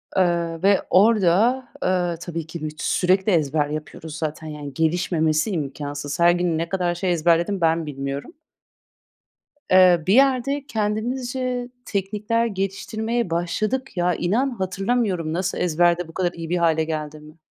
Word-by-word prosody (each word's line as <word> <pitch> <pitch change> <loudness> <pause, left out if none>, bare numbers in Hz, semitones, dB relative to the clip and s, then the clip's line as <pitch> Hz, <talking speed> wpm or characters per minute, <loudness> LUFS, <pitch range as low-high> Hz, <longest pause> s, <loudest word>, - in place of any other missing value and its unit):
Eee, 170 -3 +1
ve 200 -1 +4
orada, 215 +5 +4 0.2
eee, 180 -2 +1
tabii 165 -2 -5
ki 165 -1 -8
büt 155 +1 -6
sürekli 190 +3 +2
ezber 150 -2 +1
yapıyoruz 155 +1 -7
zaten, 155 0 -4
yani, 145 -2 -7
gelişmemesi 160 +2 +1
imkansız. 145 -1 -4
Her 170 0 +6
gün 175 -2 0
ne 165 +1 -2
kadar 180 -2 0
şey 180 0 -1
ezberledim 170 +3 +2
ben 165 0 +2
bilmiyorum. 140 -1 -5 1.4
Eee, 180 -3 +6
bir 195 - +4
yerde 275 +1 +3
kendimizce 245 +3 -2 0.2
teknikler 210 +4 -1
geliştirmeye 220 +2 -2
başladık. 215 +9 -2
Ya, 175 0 +2
inan, 230 +10 +1
hatırlamıyorum 195 -4 -1
nasıl 185 +2 -2
ezberde 175 0 +2
bu 165 - -13
kadar 180 -1 0
iyi 165 -1 -7
bir 180 - +1
hâle 160 -2 +2
geldiğimi. 155 0 -6
175 Hz, 135 wpm, -22 LUFS, 160-210 Hz, 1.4 s, Her